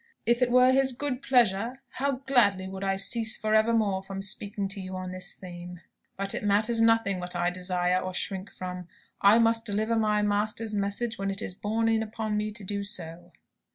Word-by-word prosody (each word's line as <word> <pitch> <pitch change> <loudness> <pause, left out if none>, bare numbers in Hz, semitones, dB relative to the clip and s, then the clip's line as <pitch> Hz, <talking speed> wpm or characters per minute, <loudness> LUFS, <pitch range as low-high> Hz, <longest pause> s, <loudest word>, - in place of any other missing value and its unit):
"If 235 +2 +2
it 250 - +3
were 250 +1 +5
His 265 0 +4
good 260 0 -3
pleasure, 245 0 +1
how 270 -1 -2
gladly 205 -8 +2
would 190 0 -7
I 195 0 0
cease 225 +3 +2
for 215 0 -1
evermore 220 -3 +2
from 195 0 -7
speaking 200 +1 +1
to 200 0 -1
you 185 0 -7
on 185 0 -5
this 185 0 -4
theme! 175 -1 -10 0.4
But 195 0 -1
it - - -4
matters 215 +3 +2
nothing 225 -4 +3
what 180 0 -6
I 175 0 0
desire 180 0 +1
or 185 - -4
shrink 190 +2 -4
from. 180 -1 -7 0.3
I 200 +3 +6
must 230 0 +3
deliver 220 +1 0
my 210 -1 +1
Master's 215 +2 -1
message 205 +3 -2
when 195 0 -2
it 195 0 -3
is - - -4
borne 220 +4 -1
in 225 -1 +2
upon 220 -1 -3
me 210 0 -1
to 210 0 -6
do 200 +1 -3
so." 175 -2 -4
205 Hz, 200 wpm, -27 LUFS, 190-225 Hz, 0.4 s, I